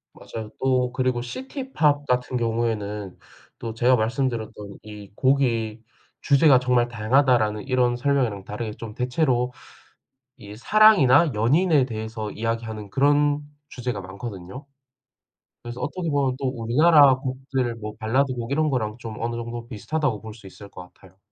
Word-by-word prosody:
맞아요. 110 Hz, -1 st, -8 dB
또 125 Hz, -2 st, +1 dB
그리고 130 Hz, -1 st, -1 dB
시티팝 160 Hz, -, -1 dB
같은 125 Hz, -1 st, 0 dB
경우에는 110 Hz, -4 st, -2 dB, 0.4 s
또 115 Hz, -1 st, -6 dB
제가 125 Hz, +3 st, +3 dB
말씀드렸던 110 Hz, -3 st, -3 dB
"이 105 Hz, -2 st, -11 dB
곡의 115 Hz, -5 st, +1 dB, 0.4 s
주제가 140 Hz, -2 st, +5 dB
정말 125 Hz, -1 st, +2 dB
다양하다."라는 115 Hz, -2 st, +2 dB
이런 125 Hz, -2 st, +2 dB
설명이랑 125 Hz, -6 st, 0 dB
다르게 110 Hz, +2 st, -5 dB
좀 110 Hz, 0 st, -9 dB
대체로 125 Hz, 0 st, 0 dB, 0.8 s
이 105 Hz, 0 st, -11 dB
사랑이나 170 Hz, -, +5 dB
연인에 140 Hz, -, +3 dB
대해서 110 Hz, -2 st, -5 dB
이야기하는 110 Hz, -2 st, -4 dB
그런 145 Hz, +4 st, +2 dB, 0.3 s
주제가 125 Hz, -4 st, -4 dB
많거든요. 95 Hz, +5 st, -8 dB, 1.0 s
그래서 120 Hz, +1 st, -7 dB
어떻게 170 Hz, +2 st, -3 dB
보면 140 Hz, -3 st, +1 dB
또 135 Hz, -1 st, -1 dB
우리나라 135 Hz, +4 st, +5 dB
곡들 130 Hz, -1 st, -3 dB
뭐 105 Hz, -1 st, -7 dB
발라드 130 Hz, +5 st, +1 dB
곡 120 Hz, 0 st, -6 dB
이런 155 Hz, +2 st, +1 dB
거랑 110 Hz, -5 st, -2 dB
좀 115 Hz, -2 st, -7 dB
어느 120 Hz, +1 st, -2 dB
정도 120 Hz, 0 st, -6 dB
비슷하다고 130 Hz, 0 st, -2 dB
볼 110 Hz, 0 st, -9 dB
수 110 Hz, -3 st, -14 dB
있을 100 Hz, +2 st, -12 dB
것 -, -, -10 dB
같아요. 95 Hz, -1 st, -20 dB
120 Hz, 330 characters per minute, -24 LUFS, 110-135 Hz, 1.0 s, 주제가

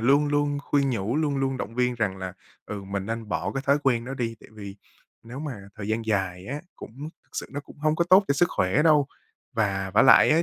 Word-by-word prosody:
luôn 140 Hz, +5 st, +4 dB
luôn 145 Hz, 0 st, +1 dB
khuyên 140 Hz, -1 st, +1 dB
nhủ, 115 Hz, +1 st, -1 dB
luôn 150 Hz, -3 st, +1 dB
luôn 135 Hz, -1 st, 0 dB
động 115 Hz, -2 st, -5 dB
viên 125 Hz, 0 st, +1 dB
rằng 105 Hz, -5 st, -1 dB
là, 95 Hz, -1 st, -5 dB, 0.3 s
ừ, 105 Hz, -2 st, -5 dB
mình 100 Hz, 0 st, -4 dB
nên 115 Hz, -1 st, -4 dB
bỏ -, -, -2 dB
cái 135 Hz, 0 st, -3 dB
thói 140 Hz, +1 st, +4 dB
quen 120 Hz, -4 st, +2 dB
đó 135 Hz, -, -5 dB
đi, 115 Hz, -3 st, -2 dB
tại -, -, -15 dB
vì 100 Hz, -2 st, -9 dB, 0.5 s
nếu 120 Hz, +3 st, -9 dB
mà 125 Hz, -10 st, -6 dB
thời 105 Hz, -1 st, -6 dB
gian 110 Hz, +1 st, -1 dB
dài 95 Hz, -3 st, -1 dB
á, 145 Hz, +5 st, -4 dB, 0.2 s
cũng 140 Hz, +7 st, -8 dB, 0.2 s
sự -, -, -4 dB
nó 145 Hz, -, -4 dB
cũng 145 Hz, -, -16 dB
hông 155 Hz, +1 st, +1 dB
có 170 Hz, -, +2 dB
tốt 190 Hz, +2 st, +8 dB
cho 140 Hz, -, +3 dB
sức 175 Hz, +5 st, +4 dB
khỏe 95 Hz, +11 st, +1 dB
đâu. 150 Hz, -3 st, +5 dB, 0.5 s
Và 100 Hz, -5 st, 0 dB
vả 110 Hz, -, +6 dB
lại 130 Hz, +2 st, +7 dB
á 165 Hz, +2 st, +4 dB
125 Hz, 240 wpm, -26 LUFS, 105-145 Hz, 0.5 s, tốt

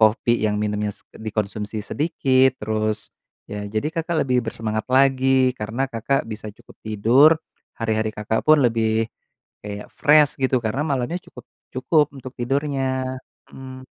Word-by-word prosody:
kopi 115 Hz, +2 st, +3 dB
yang 105 Hz, -1 st, +1 dB
minumnya 105 Hz, 0 st, -1 dB
s -, -, -15 dB
dikonsumsi 105 Hz, 0 st, -4 dB
sedikit, 130 Hz, -2 st, +2 dB
terus 110 Hz, 0 st, -2 dB, 0.4 s
ya 105 Hz, 0 st, -5 dB
jadi 110 Hz, +8 st, -2 dB
Kakak 165 Hz, 0 st, 0 dB
lebih 125 Hz, -2 st, +1 dB
bersemangat 110 Hz, -1 st, -2 dB
lagi 130 Hz, -1 st, +4 dB
karena 115 Hz, +6 st, -2 dB
Kakak 120 Hz, +4 st, 0 dB
bisa 110 Hz, -1 st, -6 dB
cukup 120 Hz, -, -19 dB
tidur, 115 Hz, +8 st, +5 dB, 0.4 s
hari-hari 110 Hz, -1 st, -1 dB
Kakak 105 Hz, +1 st, -1 dB
pun 155 Hz, -1 st, +6 dB
lebih 115 Hz, -1 st, +1 dB, 0.6 s
kayak 105 Hz, 0 st, -7 dB
fresh 150 Hz, -1 st, +4 dB
gitu. 130 Hz, -1 st, +2 dB
Karena 115 Hz, +6 st, -1 dB
malamnya 135 Hz, +3 st, -1 dB
cukup 125 Hz, -, -13 dB, 0.3 s
cukup 150 Hz, +3 st, +2 dB
untuk 130 Hz, -1 st, -9 dB
tidurnya. 130 Hz, 0 st, -1 dB, 0.4 s
Mmm. 130 Hz, -1 st, -10 dB
120 Hz, 135 wpm, -22 LUFS, 110-135 Hz, 0.6 s, pun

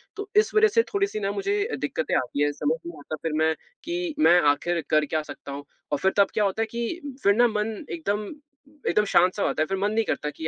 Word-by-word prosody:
तो 410 Hz, 0 st, -6 dB
इस 425 Hz, +1 st, +4 dB
वजह 435 Hz, +1 st, +6 dB
से 460 Hz, -, +7 dB
थोड़ी-सी 400 Hz, -, 0 dB
ना, 200 Hz, -1 st, -1 dB
मुझे 395 Hz, -, -1 dB, 0.2 s
दिक्कतें -, -, -1 dB
आती 145 Hz, -, -2 dB
हैं, 145 Hz, -, +2 dB
समझ 150 Hz, +2 st, 0 dB
नहीं 170 Hz, -2 st, -8 dB
आता, 155 Hz, +2 st, -6 dB
फिर 160 Hz, -2 st, -1 dB
मैं, 160 Hz, 0 st, +3 dB, 0.3 s
कि 345 Hz, -1 st, -3 dB
मैं 180 Hz, -, +6 dB
आखिर 170 Hz, +3 st, -2 dB
कर 155 Hz, 0 st, +3 dB
क्या 155 Hz, +2 st, -1 dB
सकता 140 Hz, -, -9 dB
हूँ? 140 Hz, +1 st, -6 dB, 0.3 s
और 145 Hz, -, +2 dB
फिर 190 Hz, +6 st, +2 dB
तब 200 Hz, -1 st, +6 dB
क्या 210 Hz, -, +1 dB
होता 200 Hz, +2 st, 0 dB
है 225 Hz, -, +2 dB
कि 275 Hz, +6 st, -4 dB
फिर 200 Hz, -, +5 dB
ना, 240 Hz, +2 st, +5 dB
मन 215 Hz, 0 st, -2 dB
एकदम 210 Hz, -11 st, -2 dB, 0.6 s
एकदम 210 Hz, -, +3 dB
शांत-सा 185 Hz, +1 st, +3 dB
हो -, -, +2 dB
जाता 155 Hz, -, 0 dB
है, -, -, -4 dB
फिर 195 Hz, -, -2 dB
मन 205 Hz, +2 st, 0 dB
नहीं 225 Hz, +1 st, +1 dB
करता 150 Hz, -, -2 dB
कि 155 Hz, +2 st, -5 dB
205 Hz, 245 wpm, -25 LUFS, -, 0.6 s, से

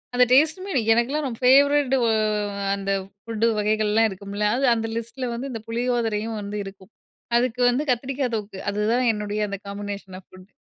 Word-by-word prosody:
அந்த 250 Hz, 0 st, +6 dB
டேஸ்ட்டுமே 320 Hz, +8 st, +3 dB, 0.2 s
எனக்கெல்லாம் 275 Hz, +6 st, 0 dB
ரொம்ப, 230 Hz, -3 st, -6 dB
ஃபேவரெட் 280 Hz, +1 st, +5 dB
ஒ -, -, +2 dB, 0.7 s
அந்த 195 Hz, 0 st, -3 dB, 0.3 s
ஃபுட்டு 230 Hz, 0 st, 0 dB
வகைகள்லாம் 215 Hz, +1 st, +2 dB
இருக்கும்ல்ல, 200 Hz, +2 st, -4 dB
அது 275 Hz, -, +1 dB
அந்த 225 Hz, 0 st, -2 dB
லிஸ்ட்ல 240 Hz, +2 st, -4 dB
வந்து 260 Hz, +4 st, -5 dB
இந்த 225 Hz, -2 st, -5 dB
புளியோதரையும் 230 Hz, -2 st, -1 dB
வந்து 205 Hz, +1 st, -5 dB
இருக்கும். 195 Hz, +1 st, -12 dB, 0.5 s
அதுக்கு 250 Hz, 0 st, 0 dB
வந்து 250 Hz, +5 st, 0 dB
கத்திரிக்கா 260 Hz, +2 st, 0 dB
தொக்கு. 205 Hz, -2 st, -5 dB
அதுதான் 215 Hz, +5 st, +1 dB
என்னுடைய 210 Hz, 0 st, -3 dB
அந்த 200 Hz, -, -4 dB
காம்பினேஷன் 200 Hz, -1 st, -6 dB
ஆஃப் 185 Hz, -, -22 dB
ஃபுட். 185 Hz, 0 st, -15 dB
225 Hz, 160 wpm, -23 LUFS, 205-255 Hz, 0.7 s, அந்த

